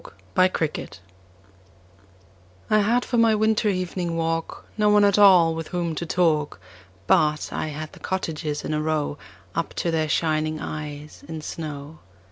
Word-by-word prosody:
Good - - -14 0.4
Hours 155 - -3 1.7
I 215 - +5
HAD 235 +4 +2
for 245 - -1
my 225 -1 +5
winter 220 0 +2
evening 180 -2 -2
walk 165 0 -2
No 210 -1 +3
one 210 0 +5
at 200 0 +3
all 180 -5 +7
with 165 -1 -5
whom 175 -2 -2
to 165 +2 -4
talk, 160 -4 +1 0.5
But 150 +8 +2
I - - -2
had 155 +1 -6
the - - -13
cottages 160 -5 -3
in - - -2
a 150 - 0
row 155 -1 -1 0.3
Up 165 - -3
to 170 - -1
their 155 -1 0
shining 155 -1 0
eyes 150 -1 -7
in 160 -1 -6
snow. 150 -1 -7
165 Hz, 155 wpm, -24 LUFS, 155-185 Hz, 1.7 s, all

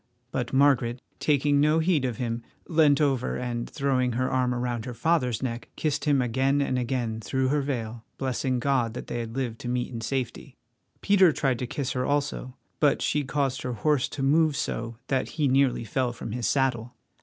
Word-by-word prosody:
But 125 -2 -2
Margaret, 130 -3 +3 0.2
taking 145 -1 +2
no 150 +2 +4
heed 160 -4 +2
of 120 -4 -2
him, 115 -1 -2 0.3
leant 155 -4 +4
over 135 -4 +1
and, 120 -1 -3
throwing 130 -4 0
her 130 +2 0
arm 130 -1 +1
around 120 -2 -2
her 125 - -6
father's 130 -4 +1
neck, 115 -3 -4
kissed 150 -1 -1
him 140 -4 +3
again 135 +4 +1
and 130 -2 0
again 120 -3 -2
through 130 +6 0
her 145 +1 +2
veil, 120 -5 -4
blessing 130 -1 -1
God 120 -3 +1
that - - -5
they 120 - -4
had 115 0 -5
lived 120 -4 -3
to 120 - -5
meet 125 0 -1
in 115 - -4
safety. 130 +2 -4 0.5
Peter 190 -4 +5
tried 135 -5 0
to 125 - -3
kiss 135 +1 -3
her 125 - -1
also; 140 -2 -2 0.2
but 145 -2 +3
she 150 - +1
caused 135 -1 -1
her 125 - -3
horse 145 +2 +1
to 135 - -4
move 155 +2 +3
so 115 -5 -3
that 135 -2 -1
he 150 -3 +2
nearly 135 -2 +2
fell 125 +3 -1
from 115 -2 -7
his 120 0 -2
saddle. 125 -3 0
130 Hz, 195 wpm, -26 LUFS, 120-140 Hz, 0.5 s, Peter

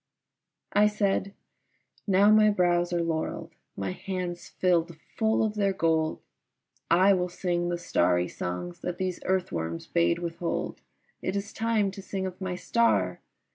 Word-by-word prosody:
I 210 +1 +5
said, 200 -2 0 0.8
"Now 200 +2 +5
my 215 0 +6
brows 175 -3 +2
are 170 -1 +1
laurelled, 160 -1 -3 0.2
my 95 -1 -2
hands 180 - -5
filled 170 -2 +1 0.2
full 220 0 +2
of 215 -1 0
their 200 -2 +1
gold, 160 -2 0 0.7
I 185 +4 +6
will 180 -1 0
sing 175 -1 -1
the 175 - -1
starry 90 - +1
songs 90 0 -5
that 180 -1 -4
these 185 -1 -2
earthworms 85 - -1
bade 170 0 +2
withhold. 170 0 -3 0.4
It - - -2
is 200 +1 -4
time 220 -3 +1
to 195 - -9
sing 190 0 -4
of 185 +1 -6
my 185 -1 -2
star!" 100 - +1
180 Hz, 145 wpm, -27 LUFS, 165-195 Hz, 0.8 s, my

